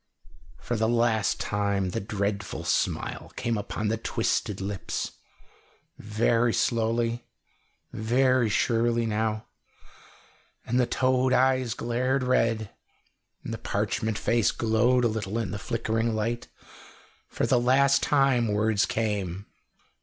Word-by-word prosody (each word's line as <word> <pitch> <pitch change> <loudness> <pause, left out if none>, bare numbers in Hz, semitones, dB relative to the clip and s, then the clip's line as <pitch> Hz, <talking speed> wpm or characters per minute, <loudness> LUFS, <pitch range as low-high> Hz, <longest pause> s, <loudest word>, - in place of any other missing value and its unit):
For 120 - -3
the 110 0 +1
last 115 -3 +1
time 100 -2 -1
the - - -2
dreadful 100 0 -3
smile - - -1
came 115 -1 -1
upon 105 +1 -3
the 110 - 0
twisted 105 -2 -1
lips, 95 -2 -4 0.9
very 115 +2 +1
slowly, 115 0 0 0.7
very 125 +2 +2
surely 115 +2 +1
now, 110 0 -1 1.2
and 125 +2 0
the 125 - +2
toad 130 0 +2
eyes 130 -2 +2
glared 130 +3 0
red, 115 -4 +1 0.7
and - - -5
the - - -5
parchment 110 -1 -1
face 115 -1 +2
glowed 120 +2 +2
a - - +5
little 110 -1 -3
in 110 -6 -2
the 100 - -4
flickering 115 0 -1
light. 115 +2 -2 0.8
For - - -2
the 125 - +3
last 135 +3 +4
time 135 -5 +3
words 105 0 +1
came. 100 -4 -2
115 Hz, 120 wpm, -27 LUFS, 105-120 Hz, 1.2 s, a